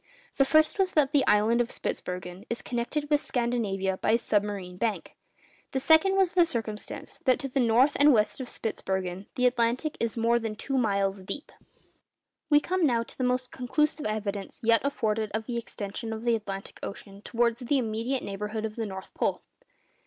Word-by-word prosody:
The 275 - +5
first 310 +6 +3
was 380 -1 +2
that 290 -3 +3
the 290 -3 +4
island 220 +3 +4
of 240 - -1
Spitzbergen 180 +3 -5
is 235 - -3
connected 250 +5 -2
with 295 -1 +4
Scandinavia 210 -6 -1
by 215 - +1
a - - +6
submarine 205 -5 -1
bank; 220 +2 -2 0.6
the 265 - +1
second 320 +7 +5
was 380 -3 +3
the 355 - +6
circumstance 225 -9 -4
that 255 -2 +4
to 275 - -3
the 270 +1 -1
north 245 +4 +4
and 290 +1 +7
west 215 -1 +2
of 250 - -6
Spitzbergen 190 -3 -3
the 250 - +1
Atlantic 250 +4 +1
is 230 -1 -1
more 230 +1 +3
than 225 -2 -4
two 270 +4 -1
miles 200 -4 0
deep! 285 - -6 1.0
We 295 -1 +6
come 365 +4 -1
now 240 -6 +3
to - - -11
the 260 - -3
most 250 0 0
conclusive 300 +3 0
evidence 205 -2 -4
yet 230 -1 +4
afforded 220 -6 0
of 220 0 -2
the 235 -1 -2
extension 225 0 -5
of 220 +1 -6
the 235 -1 +3
Atlantic 200 -3 -6
Ocean 200 0 -8
towards 235 +1 0
the 260 +3 +1
immediate 235 +2 -1
neighbourhood 210 +2 -4
of 215 0 -6
the 225 -2 -2
North 190 -1 -8
Pole. - - -1
230 Hz, 185 wpm, -28 LUFS, 210-265 Hz, 1.0 s, and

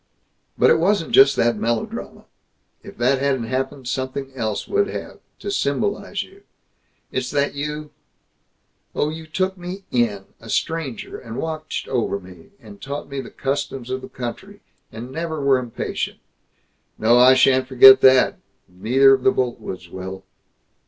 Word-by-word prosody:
But - - +5
it - - +4
wasn't 185 0 +1
just 135 +1 +6
that 120 -1 +2
melodrama. 115 +1 -3 0.6
If - - -13
that 130 +3 +2
hadn't 135 -3 0
happened, 130 +2 -3
something 130 +1 -3
else 110 -5 -3
would 405 0 +1
have, - - -7 0.2
to 405 - -5
symbolize 405 0 -1
you. 395 +1 -18 0.7
It's - - -2
that 145 0 0
you 150 +1 -5 1.0
oh, 150 - +1
you 160 +1 -8
took 185 +3 -2
me 180 +3 -7
in, 110 -5 0
a 115 - -13
stranger, 160 -5 -3
and 115 0 -8
watched 155 -1 -4
over 115 -6 -1
me, 90 -3 -15
and 105 -3 -14
taught 140 +2 -6
me 140 -1 -4
the - - -10
customs 135 -2 -4
of 130 0 -3
the - - -10
country, 190 +12 -7 0.3
and 110 +2 -7
were 130 - -11
never 155 -4 +1
impatient. 120 -3 -4 0.8
No, 115 +3 +4
I 130 +1 +7
shan't 130 0 +4
forget 130 0 +8
that; 130 -1 +5 0.3
neither 125 +9 +4
of 135 - +1
the 195 - +4
Boltwoods 120 - -3
will." 95 +1 -7
130 Hz, 150 wpm, -21 LUFS, 120-150 Hz, 1.0 s, forget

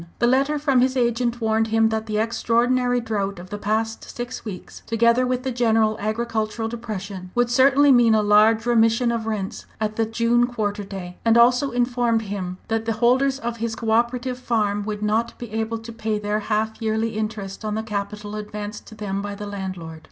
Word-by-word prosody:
The - - +2
letter 270 +5 +2
from 275 -4 +2
his 260 +1 +1
agent 240 0 +1
warned 220 0 +2
him 225 0 +3
that 220 0 -2
the 215 -1 -1
extraordinary 245 +2 +1
drought 205 -4 -2
of 180 +2 -11
the 205 - -4
past 220 +2 -1
six 245 +1 -6
weeks, 195 -5 -8
together 235 +2 +3
with 255 0 -1
the 260 - -2
general 225 -3 +2
agricultural 220 0 -2
depression, 205 -5 -6
would 245 0 +2
certainly 275 +3 +5
mean 240 -3 +5
a 215 - +3
large 215 +2 +4
remission 235 0 +3
of 230 -1 -3
rents 205 -3 -4
at 215 0 -2
the 225 -1 +1
June 235 +2 +2
quarter 210 -4 -2
day, 185 -2 -8
and 230 0 +4
also 245 +3 +5
informed 240 -2 +1
him 190 -3 -4
that 225 0 -1
the 225 - 0
holders 255 +4 +2
of 235 -3 -4
his 230 0 -3
co 225 -1 -2
operative 245 +2 0
farm 210 -4 0
would 210 -1 -4
not 220 +3 0
be 240 -3 -8
able 225 +1 -2
to 225 +1 -9
pay 220 -1 -2
their 210 0 -1
half 220 +1 -2
yearly 220 0 0
interest 215 -2 -4
on 210 -1 -2
the 220 - -2
capital 210 -1 -4
advanced 210 0 -6
to 220 - -11
them 200 -2 -3
by 205 0 -5
the 205 +1 -7
landlord. 185 -5 -6
225 Hz, 195 wpm, -23 LUFS, 210-240 Hz, -, certainly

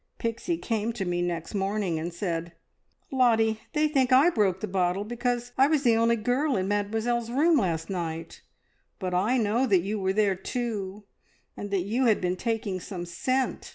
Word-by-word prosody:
Pixie 235 +9 -2
came 225 -5 -2
to 210 -5 -3
me 175 0 -1
next 170 0 -3
morning 195 -4 -1
and 170 +2 -4
said, 170 -1 -3 0.6
`Lottie, 225 -4 +3
they 305 0 +3
think 270 -4 +1
I 275 +7 +6
broke 195 - +1
the 215 - -3
bottle 185 0 0
because 240 +2 -2
I 270 - +7
was 300 -2 +1
the 235 -3 +4
only 230 +1 +3
girl 250 +4 0
in 185 0 -1
Mademoiselle's 225 +3 -1
room 305 +6 +3
last 165 -6 -1
night; 165 -3 -5 0.6
but 185 -2 -3
I 210 +8 +2
know 230 +3 +1
that 190 -5 +4
you 205 +4 -3
were 190 0 0
there 205 -1 +3
too, 205 -1 -4 0.5
and 205 - -6
that 200 -2 0
you 235 +7 0
had 220 -3 +4
been 180 0 -1
taking 220 -2 -2
some 175 -1 -6
scent!' 255 +10 -2
215 Hz, 185 wpm, -27 LUFS, 185-240 Hz, 0.6 s, I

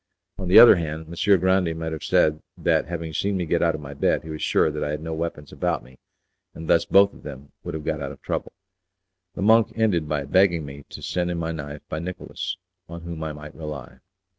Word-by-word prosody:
On 95 - -4
the 90 - +6
other 115 -3 +10
hand, 80 -1 -4
Messer 95 +4 +3
Grande 90 -2 +1
might 80 0 -4
have 80 - -5
said 75 0 +2 0.2
that, - - +1
having 85 -1 -5
seen 100 +4 0
me 90 - -1
get 85 +1 +1
out 85 -2 +2
of 75 - -7
my 70 -1 -8
bed, 70 - +1
he 80 - -8
was 75 - -6
sure 80 - +2
that 75 - -3
I - - -2
had 75 +1 -3
no 80 0 -4
weapons 80 -2 -4
about - - -1
me, 65 0 -18 0.6
and 80 - -8
thus 85 - +4
both 100 +1 +5
of - - -15
them 70 -1 -10
would - - -5
have 80 -1 -6
got 75 -1 -2
out 70 -1 -4
of - - -12
trouble. - - -3 0.8
The - - -3
monk 110 +1 +5
ended 95 -9 +1
by 75 -2 -1
begging 85 0 +3
me 70 0 -10
to - - -10
send 90 -1 -1
him 85 - -2
my 85 0 -2
knife 75 -2 -7
by 75 - -4
Nicolas, 90 +2 -5 0.3
on 85 0 -8
whom 85 -2 -6
I 80 - -3
might 75 +1 -10
rely. 70 -5 -8
80 Hz, 240 wpm, -24 LUFS, 75-90 Hz, 0.8 s, other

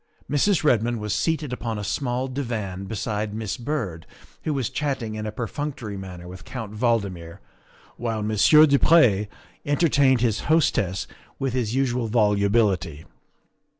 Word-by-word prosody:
Mrs. 165 +6 +2
Redmond 120 -4 +2
was 105 -1 -2
seated 150 +5 -1
upon 115 -2 -3
a 105 - -4
small 125 +3 -1
divan 110 -8 -4
beside 105 0 -3
Miss 110 -2 -3
Byrd, 115 - -4 0.4
who 155 - 0
was 130 -5 -2
chatting 135 -7 -2
in 110 0 -4
a - - -3
perfunctory 120 -1 -5
manner 90 -2 -8
with 95 +2 -10
Count 110 -4 -7
Valdmir, 100 -7 -1 0.6
while 115 -3 -2
Monsieur 110 +9 +6
du 140 -2 +3
Pre 110 -11 +5 0.4
entertained 140 -4 +3
his 110 -4 +1
hostess 100 - +2 0.3
with 135 -3 -2
his 120 -2 -1
usual 125 -3 0
volubility. 100 -7 +1
115 Hz, 140 wpm, -24 LUFS, 105-130 Hz, 0.6 s, Monsieur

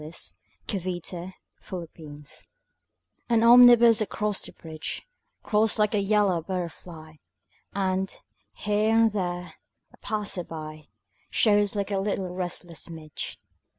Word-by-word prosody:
SYMPHONY 175 +3 -5
IN 180 +2 -6 0.4
YELLOW 160 -4 -8 1.1
AN 230 -1 +4
omnibus 235 -1 +8
across 210 -1 -1
the - - -6
bridge 160 -1 -6 0.4
Crawls 215 +1 +2
like 210 0 +2
a 210 - +2
yellow 200 -3 +2
butterfly 165 -3 -6 0.6
And, 190 -1 0 0.4
here 210 +1 +1
and 225 -1 +5
there, 180 -3 -3 0.4
a - - -18
passer 210 -4 -1
by 155 -2 -8 0.4
Shows 205 -2 +3
like 200 0 -2
a 195 - +1
little 195 -2 -2
restless 175 -2 -3
midge. 160 -2 -6
190 Hz, 115 wpm, -26 LUFS, 170-210 Hz, 1.1 s, omnibus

